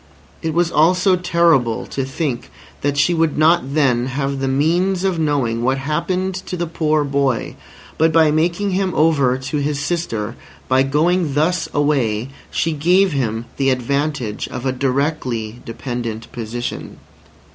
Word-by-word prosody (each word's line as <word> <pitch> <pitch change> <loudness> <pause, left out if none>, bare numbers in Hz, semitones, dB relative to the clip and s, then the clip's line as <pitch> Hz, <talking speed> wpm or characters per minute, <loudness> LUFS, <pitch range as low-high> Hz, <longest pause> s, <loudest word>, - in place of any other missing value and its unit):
It 160 -1 -2
was 170 -1 +2
also 180 +4 +4
terrible 170 -9 +2
to 135 - -3
think 135 -2 -3 0.3
that 145 0 0
she 145 +5 +3
would 165 -2 +1
not 155 -2 +3
then 125 -5 +2
have 135 +1 -2
the 135 - -1
means 175 +7 +1
of 190 -3 0
knowing 135 -7 0
what 130 +2 +1
happened 170 +7 -1
to 185 0 -5
the 175 - -1
poor 155 -2 0
boy. 140 -3 -1 0.4
But 160 +1 +4
by 160 -1 +4
making 170 +6 +1
him 185 -1 0
over 140 -5 +3
to 135 +3 -4
his 145 0 -1
sister, 135 -8 -2 0.3
by 130 0 +3
going 155 +3 +1
thus 165 +4 +1
away, 135 -6 0 0.2
she 165 - 0
gave 180 +5 +3
him 115 -5 -2
the 135 -1 +2
advantage 130 -3 -1
of 125 +1 -6
a 130 - +2
directly 130 -4 -2
dependent 115 -1 -5
position. 120 +1 -5
145 Hz, 150 wpm, -19 LUFS, 130-165 Hz, 0.4 s, also